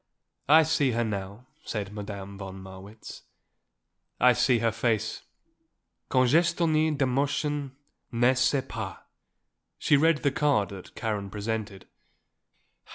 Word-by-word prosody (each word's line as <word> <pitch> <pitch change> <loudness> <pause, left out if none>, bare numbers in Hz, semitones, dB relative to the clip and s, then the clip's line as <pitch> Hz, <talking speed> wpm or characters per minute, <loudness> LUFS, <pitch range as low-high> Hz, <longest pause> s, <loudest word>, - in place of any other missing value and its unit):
"I 160 +2 +8
see 150 -5 +1
her 120 +1 +1
now," 100 +2 -5 0.2
said 105 -2 -4
Madame 100 -1 -7
von 95 -1 -8
Marwitz. 95 +3 -11 1.0
"I 125 0 +6
see 125 0 +3
her 115 0 +1
face; 110 -1 -1 0.9
congestionnée 155 +3 +2
d'émotion, 140 +1 -1 0.4
n'est 120 +2 +3
ce 140 -2 +2
pas." 110 -4 -5 0.8
She 145 - +3
read 160 +1 +2
the 140 - +3
card 135 -8 +1
that 95 -2 -11
Karen 105 -4 -3
presented. 105 -1 -4
115 Hz, 110 wpm, -27 LUFS, 100-140 Hz, 1.0 s, I